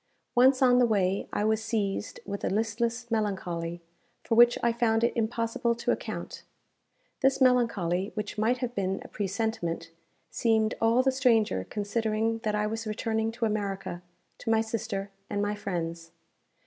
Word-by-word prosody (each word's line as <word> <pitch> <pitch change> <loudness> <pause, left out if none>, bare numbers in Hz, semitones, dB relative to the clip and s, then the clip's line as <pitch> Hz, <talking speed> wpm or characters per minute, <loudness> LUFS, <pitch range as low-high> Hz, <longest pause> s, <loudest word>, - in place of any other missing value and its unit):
Once 260 +2 +5
on 250 -1 +6
the 245 - +6
way, 195 -3 +1
I - - -1
was 220 0 +2
seized 215 -2 -2
with 200 0 -5
a - - +1
listless 230 +3 -1
melancholy, 175 -6 -2 0.4
for - - -1
which 240 +1 +6
I 235 -1 +3
found 230 -1 +2
it 235 - +2
impossible 230 0 0
to 230 - -1
account. - - -4 0.8
This 270 0 +3
melancholy, 220 -8 +2
which 210 -2 -4
might 220 +4 +1
have 240 - -7
been 195 -3 -1
a - - -10
presentiment, 195 -5 -2 0.4
seemed 220 -2 +2
all 230 +3 +4
the 265 - +3
stranger 230 - +2
considering 220 +2 -1
that 215 -1 -1
I 210 0 +1
was 225 +1 -3
returning 220 +1 -1
to 235 0 -1
America, 200 -4 -3 0.4
to 230 - -5
my 225 0 +4
sister, 200 -3 -3 0.2
and 205 - -2
my 205 0 0
friends. 170 -5 -4
220 Hz, 160 wpm, -28 LUFS, 200-230 Hz, 0.8 s, on